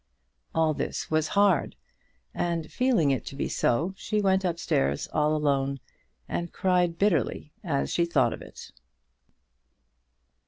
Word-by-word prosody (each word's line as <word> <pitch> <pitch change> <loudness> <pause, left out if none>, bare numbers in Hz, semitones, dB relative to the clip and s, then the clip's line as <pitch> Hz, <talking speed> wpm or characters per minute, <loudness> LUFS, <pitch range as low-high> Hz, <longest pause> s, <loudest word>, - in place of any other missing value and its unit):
All 160 -1 +3
this - - -4
was 155 0 +2
hard, 200 -3 +3 0.6
and 165 -2 -2
feeling 240 - +2
it 135 - -1
to - - -6
be - - -2
so, 160 +11 0
she 210 +2 -2
went 190 -1 +2
up 175 -3 -1
stairs, 70 - 0
all 150 0 +2
alone, 140 -2 0 0.5
and 170 -1 -3
cried 180 -2 +1
bitterly 165 - 0
as 145 -7 -1
she 170 - +2
thought 170 - +2
of - - -9
it. - - -11
165 Hz, 135 wpm, -27 LUFS, 145-185 Hz, 0.6 s, All